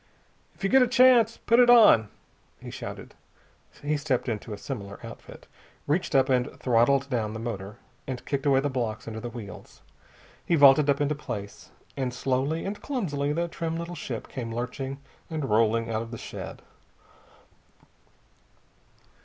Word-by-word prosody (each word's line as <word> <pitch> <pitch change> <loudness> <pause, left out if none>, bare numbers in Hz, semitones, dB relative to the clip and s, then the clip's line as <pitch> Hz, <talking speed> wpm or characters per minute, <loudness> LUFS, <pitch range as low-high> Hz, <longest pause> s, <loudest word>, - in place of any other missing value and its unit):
"If - - -16
you 195 - +2
get 265 - +6
a 250 - +4
chance, 240 -2 +5
put 235 +2 +2
it 245 -1 +6
on!" 215 - +7 0.5
he - - -9
shouted. - - -8 0.7
He 150 +1 0
stepped 140 -4 -1
into 110 -1 -4
a 105 - -5
similar 100 -4 -7
outfit, - - -11 0.4
reached 155 0 -1
up 135 -1 +5
and 130 +1 +1
throttled 130 +3 +3
down 115 -5 -2
the 110 - -6
motor, 105 -3 -6 0.3
and 130 -2 -5
kicked 140 0 -2
away 135 -1 +4
the 145 - 0
blocks 115 -4 -3
under 110 -1 -5
the 120 - -6
wheels. 110 -4 -11 0.6
He 170 - +1
vaulted 145 0 +6
up 140 0 +2
into 145 +1 +1
place. 115 -9 -7 0.3
And 130 -3 -3
slowly 135 +5 -1
and 205 +2 -5
clumsily 150 - -2
the 170 +3 -1
trim 165 -1 -4
little 170 +1 -5
ship 120 -9 -6
came 115 -3 -6
lurching 125 +3 -4 0.3
and 155 -8 -3
rolling 115 +1 +2
out 110 0 -1
of 115 - -7
the 115 - -7
shed. - - -8
135 Hz, 160 wpm, -26 LUFS, 115-155 Hz, 0.7 s, on